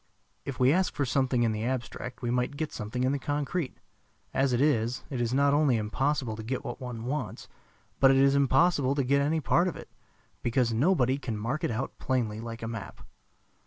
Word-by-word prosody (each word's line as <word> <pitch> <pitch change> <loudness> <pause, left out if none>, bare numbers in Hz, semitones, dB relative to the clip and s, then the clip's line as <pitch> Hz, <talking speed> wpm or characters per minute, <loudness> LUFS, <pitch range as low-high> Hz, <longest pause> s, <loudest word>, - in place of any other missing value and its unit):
If 140 - -5
we 130 +2 +5
ask 185 +1 +1
for 140 - 0
something 125 -1 +1
in 115 - +2
the 110 0 -3
abstract 125 0 -4
we 120 - 0
might 125 +3 -1
get 155 0 -2
something 115 +3 -3
in 130 - +2
the 140 - -1
concrete. 145 +2 -2 0.6
As 135 0 +2
it 120 - +1
is, 125 -3 +1
it 130 -3 -2
is 120 -1 0
not 140 +2 +3
only 145 -5 +3
impossible 120 +2 -1
to - - -5
get 125 +4 -3
what - - -6
one 120 -3 -6
wants, 145 +4 -4 0.5
but 135 - +7
it 135 - +5
is 135 0 +5
impossible 140 0 +3
to 140 - +1
get 140 +2 +2
any 155 +3 +1
part 170 +5 +3
of 180 - -3
it, - - -11 0.5
because 120 0 +1
nobody 135 0 +2
can 115 -6 -4
mark 120 +8 -3
it - - +1
out 120 +4 -4
plainly 115 -5 -1
like 115 0 -7
a - - -3
map. 110 -6 -7
130 Hz, 210 wpm, -28 LUFS, 120-140 Hz, 0.6 s, but